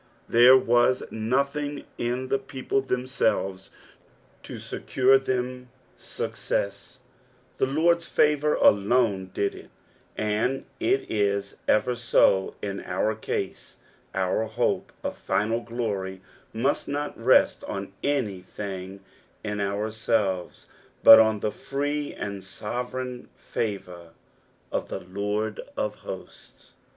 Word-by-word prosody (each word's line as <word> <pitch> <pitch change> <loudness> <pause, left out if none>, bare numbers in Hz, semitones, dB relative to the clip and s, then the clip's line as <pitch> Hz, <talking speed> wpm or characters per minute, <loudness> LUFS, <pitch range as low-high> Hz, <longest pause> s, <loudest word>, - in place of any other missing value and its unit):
There 125 +3 +8
was 120 +1 +3
nothing 140 +6 -1
in 125 +2 -2
the 135 - +2
people 135 0 -2
themselves 125 -7 -1 0.7
to - - -8
secure 130 +1 +2
them 125 -1 -3 0.3
success, 100 +5 -4 0.6
the 130 - +3
Lord's 170 +4 +2
favour 150 0 +3
alone 100 -2 +3
did 100 - -1
it, - - -12 0.5
and 110 +5 0
it 365 +4 +1
is 100 -2 -1
ever 110 +4 +3
so 105 -5 +3
in 100 -1 -3
our 100 +4 0
case, 100 -2 -4 0.4
our 95 +3 +1
hope 110 +2 -1
of - - -4
Biial 115 +3 +1
glory 100 -6 -3 0.3
must 125 +6 0
not 145 +1 -3
rest 120 +3 +4
on 100 0 -5
anything 100 -6 -3 0.4
in 105 -1 -3
oui 100 +2 -1
aelres, 105 -4 -1 0.4
but 115 - +11
on 110 -2 +3
the 105 - 0
frett 145 +4 -3
and 100 -2 -5
sovereign 125 +6 -5
favour 90 -6 -5 0.6
of - - -2
the - - -4
Lord 105 +3 -2 0.2
of - - -1
Hosts. - - -10
110 Hz, 110 wpm, -26 LUFS, 100-130 Hz, 0.7 s, but